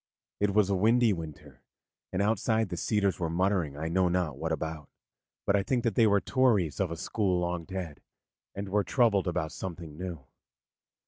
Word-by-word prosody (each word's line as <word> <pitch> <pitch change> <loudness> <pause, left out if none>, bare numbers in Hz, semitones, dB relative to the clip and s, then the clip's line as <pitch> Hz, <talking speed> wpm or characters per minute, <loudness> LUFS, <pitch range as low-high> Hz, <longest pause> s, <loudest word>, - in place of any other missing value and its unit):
It 100 -1 +1
was 105 -2 +4
a - - +3
windy 115 +3 +4
winter, 80 -4 -9 0.5
and 95 +2 0
outside 110 0 +1
the 90 - -3
cedars 100 +1 0
were 85 -2 -1
muttering 85 -4 0
I 80 +2 -3
know 90 +2 +2
not 85 -5 0
what 80 +3 -3
about; 80 -2 -4 0.6
but 100 - +3
I 100 - +3
think 120 +4 0
that 115 -3 +1
they 115 +2 +4
were 100 -1 +4
Tories 110 - +2
of - - +1
a 85 - -5
school 95 0 0
long 85 -1 -2
dead, 90 -5 -6 0.5
and 100 0 -5
were 105 +1 +2
troubled 105 -7 +2
about 85 -3 -1
something 85 -4 -7
new. 85 -6 -6
95 Hz, 185 wpm, -29 LUFS, 85-105 Hz, 0.6 s, was